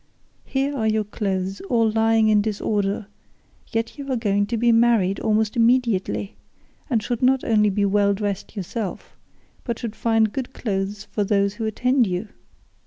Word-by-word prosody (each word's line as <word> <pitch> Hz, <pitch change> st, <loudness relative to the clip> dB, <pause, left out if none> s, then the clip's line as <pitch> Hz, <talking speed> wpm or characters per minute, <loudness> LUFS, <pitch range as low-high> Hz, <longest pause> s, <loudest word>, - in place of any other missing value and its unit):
Here 275 Hz, +1 st, -1 dB
are 220 Hz, -5 st, 0 dB
your 215 Hz, 0 st, +1 dB
clothes 195 Hz, -2 st, -3 dB
all 230 Hz, -2 st, +3 dB
lying 225 Hz, 0 st, +3 dB
in 210 Hz, -1 st, +4 dB
disorder, 205 Hz, -1 st, -1 dB, 0.7 s
yet 230 Hz, +5 st, -3 dB
you 275 Hz, -1 st, -5 dB
are -, -, +1 dB
going 205 Hz, -3 st, +1 dB
to 230 Hz, +2 st, -2 dB
be 235 Hz, +1 st, +3 dB
married 225 Hz, -5 st, +3 dB
almost 215 Hz, 0 st, +1 dB
immediately, 230 Hz, -5 st, +1 dB, 0.5 s
and 230 Hz, -5 st, +1 dB
should 240 Hz, -1 st, -3 dB
not 260 Hz, 0 st, +3 dB
only 210 Hz, -2 st, +3 dB
be 200 Hz, +1 st, +1 dB
well 200 Hz, 0 st, +2 dB
dressed 200 Hz, +1 st, -4 dB
yourself, 200 Hz, +1 st, -5 dB, 0.5 s
but 235 Hz, -3 st, -3 dB
should 225 Hz, -3 st, -5 dB
find 225 Hz, -2 st, +1 dB
good 265 Hz, -1 st, -4 dB
clothes 200 Hz, -1 st, -3 dB
for 210 Hz, -, 0 dB
those 200 Hz, 0 st, +1 dB
who 225 Hz, +1 st, -4 dB
attend 250 Hz, +2 st, +2 dB
you. 185 Hz, +3 st, -3 dB
220 Hz, 165 wpm, -23 LUFS, 200-235 Hz, 0.7 s, in